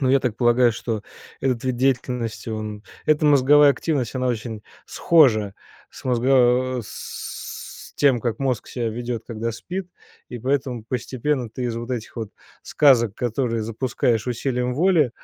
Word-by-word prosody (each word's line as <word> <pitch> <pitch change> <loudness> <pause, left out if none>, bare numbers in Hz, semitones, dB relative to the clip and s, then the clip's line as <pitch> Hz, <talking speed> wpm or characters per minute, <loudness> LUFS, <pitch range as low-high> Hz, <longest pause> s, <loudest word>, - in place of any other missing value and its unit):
Ну, 130 - +1
я 135 +1 +4
так 120 -5 -2
полагаю, 120 -1 +4
что 115 -2 -4 0.4
этот 130 -3 0
вид 130 -1 0
деятельности 125 -3 -1
он 110 -1 -5 0.2
эта 155 0 +3
мозговая 145 +1 +6
активность 140 -8 -2
она 130 0 -1
очень 110 -3 -3 0.2
схожа 110 -12 +3 0.4
с - - -13
мозго 125 0 +3
с - - -8
тем, 135 -4 +3
как 120 -2 -2
мозг 130 -5 -1
себя 120 -2 -2
ведёт, 120 0 -4
когда 115 0 -3
спит, 180 - -6 0.4
и 120 - -6
поэтому 130 -2 -1
постепенно 125 +1 -2
ты 125 +3 -5
из 120 -2 -2
вот 120 +2 -6
этих 120 -3 -4
вот 110 -3 -5 0.3
сказок, 120 -8 +3
которые 115 -1 -1
запускаешь 115 0 -1
усилием 125 0 -1
воли, 160 -3 +3
125 Hz, 150 wpm, -23 LUFS, 115-135 Hz, 0.4 s, мозговая